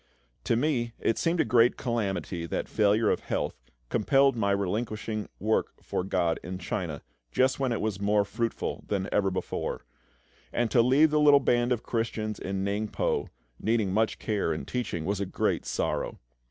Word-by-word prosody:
To - - +2
me 120 -3 0
it 115 - +1
seemed 170 +1 +1
a - - +1
great 120 -1 +4
calamity 100 -8 -2
that - - -2
failure 105 +1 +3
of - - +1
health - - -2 0.4
compelled 135 +4 +3
my 105 -3 +1
relinquishing 105 +2 -2
work 110 +2 0
for - - -2
GOD 90 -3 0
in 90 +1 -5
China, 85 -4 -4 0.3
just 130 - +2
when 135 -2 +1
it 115 - 0
was 105 -3 -2
more 105 0 +3
fruitful 115 +3 -3
than 100 -2 -1
ever 100 -2 +2
before; 95 0 -3 0.7
and 120 -2 0
to 120 - +5
leave 140 +6 +5
the 150 - +3
little 145 -1 +7
band 120 -2 +2
of 120 -2 0
Christians 110 -2 -2
in 95 0 -3
Ningpo, 105 +1 -1 0.3
needing 110 -4 +1
much 110 +2 +1
care 105 -3 -1
and 70 - -4
teaching, 115 -10 -3
was 100 +2 -1
a - - 0
great - - -1
sorrow. - - -1
110 Hz, 170 wpm, -28 LUFS, 100-120 Hz, 0.7 s, little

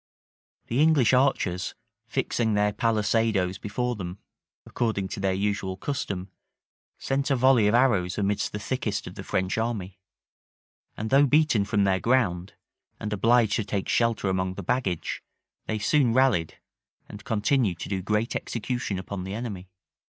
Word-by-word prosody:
The 120 +5 0
English 150 -6 +4
archers, 125 -9 +1 0.3
fixing 110 -3 0
their 105 0 +2
palisadoes 110 -4 +1
before 125 +4 -2
them, 90 -2 -6 0.5
according 110 -5 -2
to - - -5
their 95 0 +1
usual 100 -1 -2
custom, 100 -7 -4 0.7
sent 135 +1 -1
a 135 - +3
volley 125 -4 +4
of 105 - +3
arrows 105 -9 +2
amidst 100 0 0
the - - -4
thickest 105 -2 -3
of - - -8
the - - -8
French 95 +3 -1
army; 105 -5 -3 1.0
and 110 +1 -4
though 140 +1 +6
beaten 145 -8 +3
from 105 -1 +1
their 95 -1 +2
ground, 100 -6 +1 0.5
and 105 0 -3
obliged 115 +1 +3
to 110 - 0
take 100 -1 -3
shelter 115 -4 +1
among 95 0 -1
the 100 - -6
baggage, 95 -5 -1 0.5
they 110 - -1
soon 120 +2 +2
rallied, 125 -12 +2 0.5
and 105 0 -10
continued 110 -3 +1
to - - -5
do 95 -2 -2
great 105 +4 -1
execution 115 -3 -3
upon 95 0 -5
the 95 +2 -5
enemy. 100 -6 -6
105 Hz, 150 wpm, -26 LUFS, 95-120 Hz, 1.0 s, though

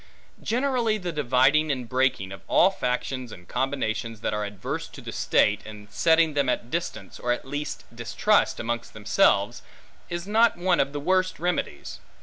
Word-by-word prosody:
Generally, 245 -3 +1
the 180 -4 -4
dividing 145 +1 +3
and 125 -3 -3
breaking, 125 -6 0
of 95 - -8
all 190 - +5
factions 125 -5 -3
and 90 -3 -12
combinations 115 -4 -2
that - - -1
are 105 0 -1
adverse 100 -2 -4
to - - -12
the - - -7
state, 105 0 +2
and 105 -1 -11
setting 160 +4 +3
them 140 -2 +1
at 120 -1 -2
distance, 110 - -4
or 125 - -1
at 120 - -2
least 145 +2 -4
distrust, 120 - +1
amongst 115 0 -3
themselves, 105 0 +2 0.5
is 175 0 -4
not 225 0 +4
one 175 0 +2
of 135 - +2
the 145 - -4
worst 185 +4 +1
remedies. 180 0 -3
135 Hz, 165 wpm, -26 LUFS, 115-175 Hz, 0.5 s, all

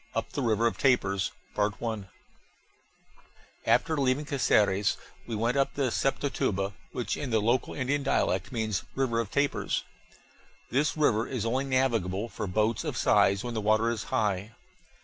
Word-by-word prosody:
UP - - -2
THE 145 - -3
RIVER 115 -2 +2
OF 115 - 0
TAPIRS 100 -8 +2 2.4
After 160 -1 +3
leaving 135 +1 +1
Caceres 105 -8 +2 0.3
we 115 - -3
went 115 +5 0
up 135 - +1
the 135 -4 0
Sepotuba, 105 -8 0 0.2
which 125 - -2
in 140 - -4
the 110 -2 +2
local 120 +4 0
Indian 140 +2 0
dialect 95 -8 0
means 110 -5 -1
River 130 -4 +1
of 115 -4 -2
Tapirs. 140 +3 0 0.9
This 145 +5 +1
river 115 -7 +2
is 120 -5 -3
only 130 +4 0
navigable 115 -6 0
for 105 - -4
boats 110 +4 +1
of - - -3
size 100 0 +3
when 120 -1 -4
the 110 - -2
water 110 +2 +3
is 110 -3 -4
high. 105 0 -1
115 Hz, 150 wpm, -28 LUFS, 105-135 Hz, 2.4 s, After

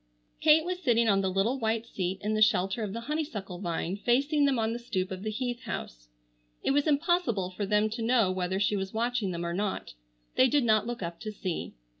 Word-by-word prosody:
Kate 315 +1 +5
was 360 0 -2
sitting 235 -6 +3
on 195 -2 +4
the 190 - 0
little 200 +8 +1
white 225 0 0
seat 190 -4 -3
in 210 +1 0
the 215 - 0
shelter 195 +1 +3
of 210 -3 -2
the 230 +3 -5
honeysuckle 230 - -4
vine 175 0 -2
facing 280 +7 +2
them 275 -2 +2
on 225 0 0
the 235 - -4
stoop 190 -6 -3
of 185 0 -5
the 215 - -3
Heath 245 +2 -3
house. - - -6 0.5
It - - +2
was 285 +2 +2
impossible 285 - +1
for 200 +2 -3
them 210 +1 +3
to 230 +2 -4
know 225 -4 +3
whether 185 +1 -1
she 205 +1 +2
was 190 -1 -3
watching 235 -2 0
them 170 -1 -3
or 170 - -2
not. 200 +2 -3 0.4
They 255 - +6
did 285 +1 +2
not 220 -1 +3
look 240 -5 -4
up 170 0 -5
to 215 - -5
see. 185 -4 -4
215 Hz, 225 wpm, -29 LUFS, 190-245 Hz, 0.5 s, They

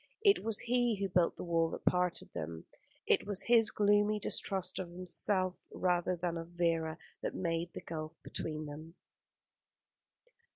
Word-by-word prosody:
It 400 -1 +5
was 220 -1 +1
he 245 -1 +2
who 195 -1 -2
built 175 -2 +2
the - - -5
wall 165 -2 +2
that - - -7
parted 180 -1 +1
them; 80 +1 -5 0.4
it - - +2
was 205 -1 0
his 230 -2 +6
gloomy 205 0 +3
distrust 190 -2 0
of 185 -2 -4
himself 185 +1 0 0.2
rather 180 0 +1
than 170 -1 -2
of 165 - -7
Vera 165 -2 0 0.2
that - - -3
made 170 -1 -1
the - - -6
gulf 155 -1 -6
between 155 -1 -4
them. 155 +3 -9
180 Hz, 155 wpm, -33 LUFS, 165-205 Hz, 0.4 s, his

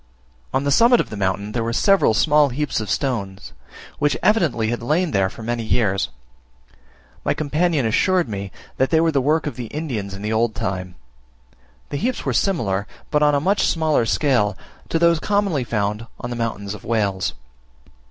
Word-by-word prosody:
On 135 - 0
the 140 - 0
summit 235 - +5
of - - -2
the - - -4
mountain 100 +1 -1
there 115 +1 -1
were 115 - -2
several 195 - +3
small 150 +3 +4
heaps 140 +1 -2
of 110 - -5
stones, 100 -8 -3 0.5
which 145 -1 +1
evidently 170 - +2
had 120 - -2
lain 155 +8 +1
there 95 -2 +2
for 115 - -11
many 120 +1 -2
years. 110 -3 0 1.1
My - - 0
companion 155 -1 0
assured 180 - +2
me 100 -2 -5 0.3
that 130 - +2
they 160 - +3
were 165 0 +3
the 140 -3 +1
work 155 +4 +1
of 150 - -4
the 120 -2 -5
Indians 115 -10 -4
in 100 - -9
the 105 +1 -1
old 110 0 +1
time. 90 -4 -4 0.9
The 145 - -3
heaps 245 - -2
were - - 0
similar, 105 - 0 0.2
but 150 - +2
on 150 -1 +4
a - - +3
much 195 +8 +2
smaller 155 -7 +1
scale, 110 - +1 0.3
to - - +1
those 170 0 +4
so - - -9
commonly 200 -9 +1
found 105 0 -2
on 120 - -5
the - - -3
mountains 105 -4 -3
of 105 - -10
Wales. 100 -8 -1
120 Hz, 190 wpm, -21 LUFS, 105-155 Hz, 1.1 s, summit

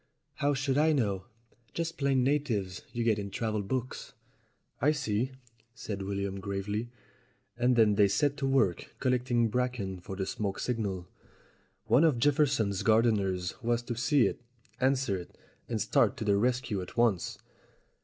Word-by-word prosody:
"How 145 0 +1
should 135 0 0
I 155 +1 +4
know? 100 -9 0 0.5
Just 165 0 -3
plain 135 -2 +2
natives 120 -10 0
you 120 - -2
get 110 -2 +2
in 100 -1 -4
travel 110 +1 -2
books." 130 +5 -4 0.7
"I 150 +4 +4
see," 130 -3 -1 0.4
said 105 -4 -5
William 100 0 -3
gravely. 100 +4 -3 0.7
And 125 +1 +2
then 110 -3 +5
they 100 0 +5
set 145 +8 +1
to 135 - -1
work 130 -10 +1
collecting 125 -2 +1
bracken 120 -6 -2
for 95 +2 -7
the 95 0 -2
smoke 100 0 -3
signal. 100 -7 -2 0.8
One 135 - +4
of 155 -6 +4
Jefferson's 135 -7 +2
gardeners 100 -5 +2
was 120 0 0
to 120 0 -4
see 125 +2 +3
it, - - -2 0.4
answer 130 -7 +1
it, 90 - -12 0.3
and 115 - -1
start 110 +5 +2
to 115 - -4
the 100 -1 +3
rescue 120 -2 0
at 90 - -10
once. 115 -7 +1
115 Hz, 155 wpm, -30 LUFS, 100-130 Hz, 0.8 s, then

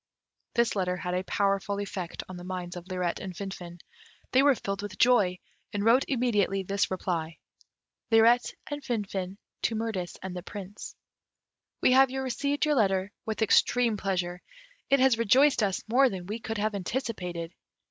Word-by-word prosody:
This 235 -2 +2
letter 180 -2 0
had 180 0 -3
a 180 +1 0
powerful 200 0 0
effect 190 -4 -5
on 185 - -8
the 175 - -9
minds 180 -1 -5
of 175 0 -8
Lirette 180 -2 -2
and 185 -2 -6
Finfin. 175 -3 -7 0.5
They 260 - +5
were 280 -1 +5
filled 195 -3 -4
with 205 -2 -7
joy, 210 -7 +4 0.3
and 205 0 -2
wrote 245 +4 +5
immediately 210 -7 +1
this 200 +2 0
reply: 170 -4 -3 0.7
Lirette 230 +2 +5
and 290 -1 -5
Finfin 200 -6 -3 0.2
to 225 - 0
Mirtis 215 -6 -3
and 190 -1 -5
the 180 - -4
Prince. 200 +1 -8 0.9
"We - - +5
have 265 +1 +6
received 265 +3 -1
your 305 - +2
letter 195 -5 +2 0.2
with 220 0 0
extreme 235 +2 +3
pleasure. 180 -3 -2 0.5
It 275 - +5
has 255 -3 +4
rejoiced 260 +5 +4
us 195 -3 0
more 260 +4 +5
than 185 -4 -6
we 210 +5 -4
could 225 -1 -4
have 215 +1 0
anticipated. 180 -6 -4
200 Hz, 165 wpm, -28 LUFS, 185-235 Hz, 0.9 s, have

